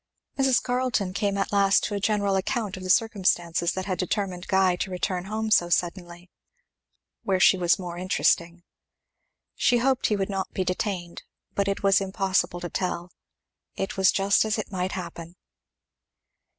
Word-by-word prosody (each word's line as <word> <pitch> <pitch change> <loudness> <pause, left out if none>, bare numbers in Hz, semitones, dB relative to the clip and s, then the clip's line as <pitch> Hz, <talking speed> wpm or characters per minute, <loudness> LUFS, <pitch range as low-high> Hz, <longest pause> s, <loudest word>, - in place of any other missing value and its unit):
Mrs. 270 -2 +2
Carleton 245 -7 -1
came 200 0 -1
at 195 - -1
last 200 -1 +3
to 210 - -2
a 200 - -1
general 205 -1 +1
account 200 +1 -2
of 185 - -9
the 185 - -6
circumstances 180 -5 +1
that 190 0 -4
had 185 -2 -3
determined 185 -1 -2
Guy 190 -2 +3
to 190 - -3
return 180 0 -2
home 220 +2 -3
so 175 -4 +4
suddenly, 175 +1 -2 0.9
where 190 -1 0
she 190 - +6
was 175 -1 +2
more 175 -2 -6
interesting. 175 -1 0 0.9
She 245 - +2
hoped 260 +2 +1
he 210 - +1
would 195 -1 -1
not 195 -2 -3
be 190 - -1
detained, 185 -1 -3 0.3
but 200 0 0
it 200 0 -2
was 195 0 +4
impossible 190 -2 -1
to 175 - -4
tell. 180 -1 -3 0.6
It 195 - -3
was 190 -1 +4
just 195 0 +3
as 220 0 -1
it 215 - -5
might 185 0 -2
happen. 170 -2 -7
190 Hz, 165 wpm, -25 LUFS, 180-205 Hz, 0.9 s, she